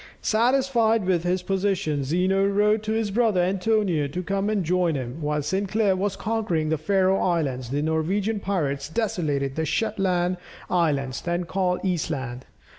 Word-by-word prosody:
Satisfied 230 -2 +2
with 180 -3 +1
his 180 +1 0
position, 190 -6 0
Zeno 185 +7 +1
wrote 210 +2 +2
to 215 0 -3
his 220 -2 0
brother 220 -3 +2
Antonio 185 -4 +1
to 180 +6 -4
come 195 +2 -1
and 210 -3 0
join 175 -1 +1
him. 130 +3 -5
While 150 0 -1
Sinclair 195 +3 +1
was 195 +1 -1
conquering 210 -9 -1
the 160 - +1
Faröe 190 +3 +2
Islands, 140 -9 -1
the 145 +3 -1
Norwegian 190 +7 0
pirates 145 -8 -2
desolated 155 - -1
the 160 - -1
Shetland 180 0 0 0.3
Islands, 140 -7 0
then 175 +1 -1
called 180 0 -1
Eastland. 140 -8 -3
180 Hz, 150 wpm, -24 LUFS, 155-205 Hz, 0.3 s, Satisfied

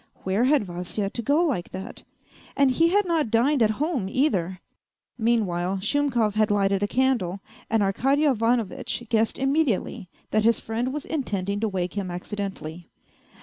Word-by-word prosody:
" - - -31
Where 195 +6 +1
had 280 -2 +3
Vasya 180 +2 -4
to 235 - -4
go 290 +8 +2
like 255 - -1
that? 190 +1 -7 0.6
And 275 -2 +4
he 330 +6 +3
had 405 +3 +3
not 325 -8 +1
dined 245 +5 +2
at 220 - +5
home 285 - -1
either! 190 - 0 0.3
" - - -59
Meanwhile, 195 -5 +1
Shumkov 240 -2 +1
had 215 0 +2
lighted 200 -1 +2
a 205 - +1
candle, 240 -7 0 0.3
and 225 -2 +2
Arkady 270 +10 +2
Ivanovitch 235 -4 0
guessed 225 -1 +1
immediately 270 - 0 0.2
that 215 0 +2
his 230 +1 +3
friend 235 +3 -2
was 295 +1 -5
intending 200 - -2
to 220 0 0
wake 180 -2 -2
him 200 -3 -3
accidentally. 180 -3 -6
220 Hz, 165 wpm, -25 LUFS, 195-270 Hz, 0.6 s, at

